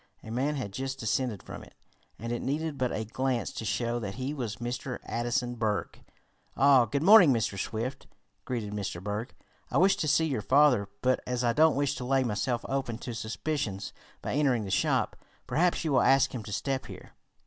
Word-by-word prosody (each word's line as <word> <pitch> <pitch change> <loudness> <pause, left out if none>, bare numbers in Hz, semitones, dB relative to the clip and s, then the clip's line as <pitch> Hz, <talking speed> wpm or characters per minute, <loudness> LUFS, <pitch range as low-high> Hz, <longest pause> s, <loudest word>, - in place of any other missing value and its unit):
A 110 - -8
man 135 +6 0
had 120 -8 -4
just 135 +2 -3
descended 115 -2 -1
from - - -9
it, - - -17 0.4
and 115 +1 -5
it 120 - -3
needed 150 +2 -2
but 130 -2 -1
a 110 - -2
glance 130 +2 -1
to - - -5
show 120 +2 -1
that 100 -4 -5
he 130 +3 -3
was 120 -7 -4
Mr. 125 +2 -4
Addison 120 +1 -1
Berg. 110 -3 -2 0.5
"Ah, 135 -3 +6
good 140 +6 -2
morning, 190 -5 +8
Mr. 110 -5 0
Swift," 115 +7 -4 0.4
greeted 115 -5 -4
Mr. 100 -4 -3
Berg. 105 +6 -4 0.3
"I - - 0
wish 190 +2 +5
to 155 - -1
see 150 +3 +3
your 135 -8 -1
father, 130 -6 +4
but 130 0 +3
as 125 0 -1
I 120 -1 +2
don't 155 +4 +4
wish 140 0 +1
to - - -5
lay 135 +1 +2
myself 120 +1 -1
open 135 -4 -2
to 120 0 -6
suspicions 110 -3 -3 0.3
by - - -2
entering 135 -5 +2
the 95 - -5
shop, - - +1 0.3
perhaps 165 +9 +1
you 155 - 0
will 130 - +4
ask 135 0 +4
him 125 - -4
to 105 - -7
step 135 +5 -2
here." - - -11
125 Hz, 200 wpm, -29 LUFS, 115-135 Hz, 0.5 s, morning